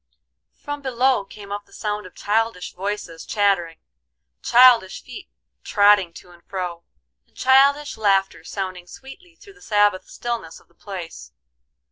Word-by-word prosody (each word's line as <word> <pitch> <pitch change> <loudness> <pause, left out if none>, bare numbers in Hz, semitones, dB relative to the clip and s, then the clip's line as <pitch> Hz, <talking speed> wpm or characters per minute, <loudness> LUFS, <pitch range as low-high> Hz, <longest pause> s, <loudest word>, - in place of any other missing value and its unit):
From 290 0 -7
below 260 -4 +1
came 200 0 -12
up 205 0 -5
the - - -26
sound 210 -2 -4
of 180 - -19
childish 220 -2 -1
voices 195 -3 -5
chattering, 195 -6 0 0.6
childish 240 -6 +5
feet - - -11 0.3
trotting 205 -4 +4
to 180 - -14
and 170 -1 -19
fro, 180 -3 -5 0.4
and - - -30
childish 275 +1 +3
laughter 195 -3 +1
sounding 185 -3 -6
sweetly 330 - -13
through 400 +3 -16
the 400 - -23
Sabbath 205 - +1
stillness 235 -9 -5
of - - -27
the - - -29
place. 170 - -9
205 Hz, 140 wpm, -22 LUFS, 185-245 Hz, 0.6 s, childish